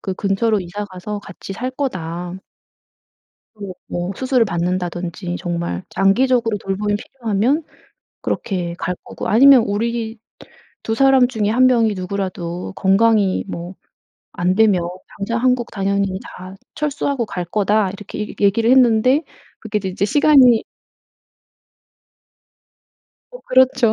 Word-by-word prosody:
그 190 Hz, -, -4 dB
근처로 205 Hz, +2 st, 0 dB
이사 185 Hz, +3 st, -5 dB
가서 205 Hz, +1 st, -6 dB
같이 195 Hz, 0 st, -9 dB
살 245 Hz, +6 st, -4 dB
거다." 180 Hz, -, -4 dB, 1.2 s
"그리고 200 Hz, -4 st, -8 dB
뭐 175 Hz, +1 st, -3 dB
수술을 255 Hz, -2 st, +2 dB
받는다든지 175 Hz, -1 st, -3 dB
정말 170 Hz, -, -3 dB
장기적으로 230 Hz, +2 st, +2 dB
돌봄이 205 Hz, +2 st, -2 dB
필요하면 235 Hz, +6 st, -1 dB, 0.6 s
그렇게 175 Hz, -4 st, -3 dB
갈 180 Hz, -, -2 dB
거고 -, -, -6 dB
아니면 260 Hz, +2 st, +7 dB
우리 225 Hz, +2 st, -2 dB, 0.6 s
2 225 Hz, -, -2 dB
사람 265 Hz, 0 st, +4 dB
중에 220 Hz, -5 st, -1 dB
1 255 Hz, +3 st, +4 dB
명이 230 Hz, -4 st, +3 dB
누구라도 185 Hz, -2 st, -4 dB
건강이 200 Hz, 0 st, +2 dB
뭐 175 Hz, +1 st, -6 dB, 0.6 s
안되면 185 Hz, +2 st, +2 dB, 0.4 s
당장 230 Hz, +4 st, -2 dB
한국 250 Hz, -2 st, +1 dB
당연히 195 Hz, -1 st, -1 dB
다 185 Hz, +1 st, -10 dB, 0.2 s
철수하고 285 Hz, -4 st, -2 dB
갈거다." 200 Hz, +2 st, 0 dB
이렇게 200 Hz, +2 st, -8 dB
얘 -, -, -9 dB
얘기를 210 Hz, +3 st, +3 dB
했는데 255 Hz, +3 st, +4 dB, 0.4 s
그게 215 Hz, -1 st, -2 dB
이제 190 Hz, -2 st, -4 dB
이제 190 Hz, +1 st, -2 dB
시간이 260 Hz, -1 st, +5 dB, 2.7 s
어 -, -, -10 dB
그렇죠. 260 Hz, -3 st, +3 dB
205 Hz, 265 characters per minute, -19 LUFS, 185-240 Hz, 2.7 s, 아니면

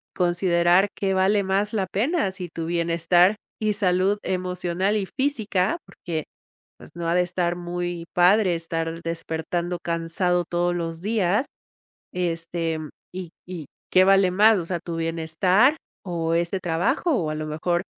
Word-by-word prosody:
considerar 175 Hz, +1 st, +3 dB
¿que 195 Hz, -1 st, 0 dB
vale 195 Hz, +2 st, +3 dB
más 195 Hz, +2 st, 0 dB
la 195 Hz, -4 st, 0 dB
pena?, 230 Hz, -, 0 dB
si 185 Hz, -1 st, -6 dB
tu 165 Hz, 0 st, -5 dB
bienestar 170 Hz, +3 st, +3 dB, 0.2 s
y 215 Hz, -1 st, +1 dB
salud 190 Hz, 0 st, +2 dB
emocional, 180 Hz, +1 st, -1 dB
y 200 Hz, -, -1 dB
física, 220 Hz, -, 0 dB
porque 160 Hz, -3 st, -5 dB, 0.5 s
pues, -, -, -14 dB
no 170 Hz, -1 st, -4 dB
ha 170 Hz, -, +2 dB
de 180 Hz, -, +4 dB
estar 175 Hz, -1 st, -1 dB
muy 175 Hz, -1 st, -4 dB
padre, 180 Hz, +1 st, +4 dB
estar 165 Hz, 0 st, -3 dB
despertando 165 Hz, +1 st, -3 dB
cansado 170 Hz, +1 st, 0 dB
todos 175 Hz, +1 st, 0 dB
los 165 Hz, -1 st, -4 dB
días, 210 Hz, +3 st, +1 dB, 0.7 s
este 165 Hz, -2 st, -2 dB, 0.3 s
y 185 Hz, -2 st, -6 dB, 0.2 s
¿y 175 Hz, -6 st, -7 dB, 0.2 s
qué 185 Hz, -, +6 dB
vale 195 Hz, -1 st, +5 dB
más?, 210 Hz, +4 st, +5 dB
o 170 Hz, -, -4 dB
sea, 175 Hz, 0 st, -2 dB
¿tu 170 Hz, 0 st, -6 dB
bienestar 165 Hz, -, +2 dB, 0.3 s
o 165 Hz, -3 st, -2 dB
este 170 Hz, +3 st, 0 dB
trabajo?, 180 Hz, -, 0 dB
o 165 Hz, -9 st, -1 dB
a 155 Hz, -, -3 dB
lo 155 Hz, 0 st, -4 dB
mejor 175 Hz, +3 st, -1 dB
175 Hz, 150 wpm, -24 LUFS, 170-190 Hz, 0.7 s, qué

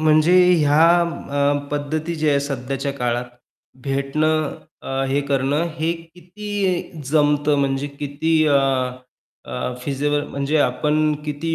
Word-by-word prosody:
म्हणजे 155 Hz, +2 st, +4 dB, 0.2 s
ह्या 150 Hz, -2 st, +2 dB
पद्धती 155 Hz, +3 st, -2 dB
जी 155 Hz, -1 st, 0 dB
आहे 140 Hz, -1 st, +3 dB
सध्याच्या 140 Hz, 0 st, -3 dB
काळात 125 Hz, -2 st, -2 dB, 0.6 s
भेटणं 150 Hz, +3 st, 0 dB, 0.3 s
अ, 135 Hz, 0 st, -2 dB
हे 140 Hz, +2 st, +1 dB
करणं 140 Hz, +3 st, +1 dB
हे 160 Hz, +2 st, +1 dB, 0.2 s
किती 185 Hz, -1 st, -3 dB
जमतं 145 Hz, -1 st, +3 dB
म्हणजे 135 Hz, 0 st, 0 dB
किती 150 Hz, +3 st, -1 dB
अ, 145 Hz, -, +3 dB, 0.9 s
अ, 125 Hz, 0 st, -4 dB
फिजिबल 145 Hz, +2 st, -1 dB
म्हणजे 140 Hz, +2 st, -1 dB
आपण 150 Hz, +3 st, +1 dB
किती 155 Hz, +2 st, -2 dB
145 Hz, 115 wpm, -21 LUFS, 140-155 Hz, 0.9 s, म्हणजे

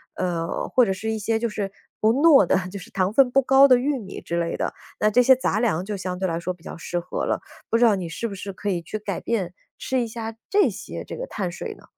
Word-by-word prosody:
呃， 170 Hz, -2 st, -2 dB
或 250 Hz, -, +4 dB
者 195 Hz, -, 0 dB
是 215 Hz, +4 st, -3 dB
一 220 Hz, -, -2 dB
些 220 Hz, +2 st, 0 dB
就 235 Hz, -, -1 dB
是， 205 Hz, -3 st, -4 dB, 0.3 s
不 215 Hz, -, +4 dB
糯 280 Hz, -1 st, +6 dB
的， -, -, +3 dB
就 200 Hz, -, -6 dB
是 200 Hz, +5 st, -12 dB
糖 190 Hz, +2 st, 0 dB
分 265 Hz, 0 st, +5 dB
不 270 Hz, +2 st, +4 dB
高 270 Hz, +2 st, +7 dB
的 255 Hz, -2 st, +6 dB
玉 270 Hz, +2 st, 0 dB
米 195 Hz, -4 st, -8 dB
之 170 Hz, 0 st, -3 dB
类 170 Hz, 0 st, -2 dB
的， -, -, -2 dB, 0.3 s
那 215 Hz, -, +3 dB
这 250 Hz, +4 st, +5 dB
些 260 Hz, +2 st, +7 dB
杂 220 Hz, -5 st, 0 dB
粮 190 Hz, -7 st, 0 dB
就 210 Hz, 0 st, -3 dB
相 185 Hz, -1 st, -4 dB
对 190 Hz, 0 st, -1 dB
来 165 Hz, 0 st, -2 dB
说 180 Hz, +2 st, -3 dB
比 170 Hz, -, -24 dB
较 -, -, -7 dB
适 175 Hz, +1 st, -3 dB
合 175 Hz, -, -4 dB
了。 -, -, 0 dB, 0.3 s
不 230 Hz, -, +3 dB
知 240 Hz, -, +5 dB
道 215 Hz, -3 st, +5 dB
你 175 Hz, -3 st, -4 dB
是 230 Hz, +7 st, -3 dB
不 200 Hz, -, -7 dB
是 195 Hz, +1 st, -6 dB
可 200 Hz, +2 st, -8 dB
以 175 Hz, -3 st, -1 dB
去 165 Hz, +6 st, -5 dB
改 205 Hz, -4 st, -4 dB
变？ 190 Hz, -7 st, -2 dB, 0.2 s
吃 260 Hz, -1 st, -1 dB
一 235 Hz, -, -2 dB
下， 225 Hz, 0 st, -6 dB
这 410 Hz, 0 st, +4 dB
些， -, -, -7 dB
这 -, -, -7 dB
个 -, -, -5 dB
碳 185 Hz, -4 st, -3 dB
水 -, -, -6 dB
呢？ -, -, -19 dB
210 Hz, 300 characters per minute, -24 LUFS, 185-240 Hz, 0.3 s, 高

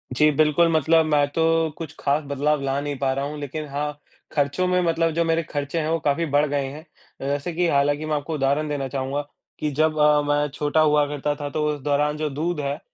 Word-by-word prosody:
जी, 150 Hz, +3 st, +5 dB
बिल्कुल, 155 Hz, +3 st, +3 dB
मतलब 160 Hz, +1 st, +3 dB
मैं 150 Hz, -2 st, +2 dB
तो 165 Hz, -, -1 dB, 0.4 s
कुछ 155 Hz, -2 st, -7 dB
ख़ास 145 Hz, +2 st, +1 dB
बदलाव 145 Hz, +1 st, 0 dB
ला 135 Hz, 0 st, -1 dB
नहीं 145 Hz, -1 st, -4 dB
पा 135 Hz, -1 st, +1 dB
रहा 135 Hz, +1 st, -2 dB
हूँ 150 Hz, +1 st, -5 dB
लेकिन 150 Hz, +2 st, -5 dB
हाँ, 145 Hz, +1 st, -3 dB, 0.4 s
खर्चों 145 Hz, +5 st, +1 dB
में 180 Hz, 0 st, +2 dB
मतलब 165 Hz, -1 st, +1 dB
जो 170 Hz, +1 st, +1 dB
मेरे 165 Hz, 0 st, +1 dB
खर्चे 145 Hz, +3 st, -2 dB
हैं 155 Hz, 0 st, -1 dB
वो 165 Hz, -, +1 dB
काफ़ी 150 Hz, +3 st, 0 dB
बढ़ 145 Hz, 0 st, +2 dB
गए 140 Hz, -1 st, 0 dB
हैं। 145 Hz, +3 st, -7 dB, 0.4 s
अ, -, -, -4 dB
जैसे 145 Hz, +4 st, -2 dB
कि 175 Hz, +1 st, +1 dB
हालाँकि 145 Hz, +1 st, +1 dB
मैं 155 Hz, -1 st, -1 dB
आपको 145 Hz, +2 st, -3 dB
उदाहरण 145 Hz, +1 st, +1 dB
देना 140 Hz, -2 st, -2 dB
चाहूँगा 135 Hz, +2 st, -2 dB, 0.4 s
कि 150 Hz, -1 st, -1 dB
जब 155 Hz, +2 st, +1 dB
अ, 150 Hz, 0 st, +5 dB
मैं 145 Hz, 0 st, +2 dB
छोटा 150 Hz, +1 st, +1 dB
हुआ 150 Hz, -1 st, +4 dB
करता 145 Hz, 0 st, -2 dB
था 145 Hz, -1 st, -5 dB
तो 150 Hz, +1 st, -1 dB
उस 145 Hz, -, -7 dB
दौरान 150 Hz, +1 st, +1 dB
जो 155 Hz, -1 st, -1 dB
दूध 155 Hz, +3 st, -2 dB
है 140 Hz, 0 st, -2 dB
150 Hz, 230 wpm, -23 LUFS, 145-155 Hz, 0.4 s, जी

